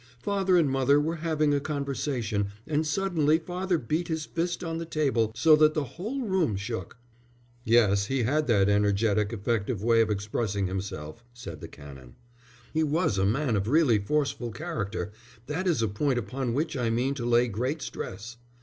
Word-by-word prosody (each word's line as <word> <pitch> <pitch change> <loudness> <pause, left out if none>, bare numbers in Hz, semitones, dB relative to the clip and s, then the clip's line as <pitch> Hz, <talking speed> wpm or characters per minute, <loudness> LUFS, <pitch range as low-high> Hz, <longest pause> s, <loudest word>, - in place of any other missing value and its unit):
"Father 195 -3 +2
and 165 -4 +4
mother 135 +1 +3
were 160 +3 -1
having 155 -2 +1
a 145 - +2
conversation, 135 -7 -2 0.2
and 155 0 0
suddenly 160 -3 +2
father 180 +2 -2
beat 155 +6 -2
his 160 -2 -2
fist 170 +2 -2
on 165 -1 -3
the 165 - -4
table 135 -9 +1
so 155 +6 +6
that 155 0 +4
the 155 - +1
whole 210 - -5
room 190 - +1
shook." 115 +5 -5 0.7
"Yes, 105 -4 +4
he 135 -1 0
had 150 +6 +1
that 100 -5 +4
energetic, 105 0 +2
effective 110 -1 -2
way 115 0 +4
of 110 - +1
expressing 105 0 -1
himself," 95 0 -5
said 85 -11 -8
the - - -7
Canon. 65 -4 -13 0.6
"He 160 - +1
was 155 - +1
a 95 - +3
man 125 +2 +1
of 100 0 -1
really 135 -5 +4
forceful 140 +2 -1
character. 110 - -4 0.3
That 160 +8 -2
is 155 -10 +2
a - - +2
point 125 +6 0
upon 120 +2 -2
which 155 +2 -1
I 120 -3 0
mean 125 +4 0
to 135 -4 -5
lay 120 +1 +4
great 125 +7 -2
stress." 115 0 -7
130 Hz, 175 wpm, -27 LUFS, 105-155 Hz, 0.7 s, so